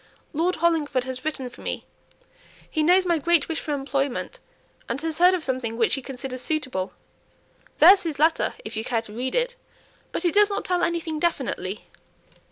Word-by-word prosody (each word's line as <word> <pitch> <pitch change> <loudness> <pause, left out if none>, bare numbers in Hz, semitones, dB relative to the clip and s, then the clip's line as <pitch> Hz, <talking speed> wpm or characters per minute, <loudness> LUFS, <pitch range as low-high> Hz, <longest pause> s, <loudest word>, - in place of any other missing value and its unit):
Lord 345 +4 +1
Hollingford 310 -6 +1
has 260 0 -6
written 285 -4 -3
for 245 - -12
me; - - -4 0.8
he 315 - -1
knows 360 +4 +5
my 340 -2 +2
great 335 0 +3
wish 325 - -2
for 300 - -5
employment, 275 -1 -2 0.5
and - - -2
has 320 0 -2
heard 360 +1 +6
of 350 - -4
something 250 -4 -2
which 230 -2 +2
he 270 - +1
considers 255 -1 -6
suitable; 260 -13 -2 0.8
there's 385 0 +8
his 330 -5 -3
letter 320 +3 +2
if 220 +2 -6
you 220 - -2
care 230 -1 -1
to 210 - -10
read 255 +3 -2
it. - - +1 0.6
But - - -3
it 345 - +2
does 415 0 +5
not 400 0 -3
tell 360 -1 +1
anything 335 -2 -1
definitely." 250 - -2
305 Hz, 180 wpm, -25 LUFS, 255-340 Hz, 0.8 s, there's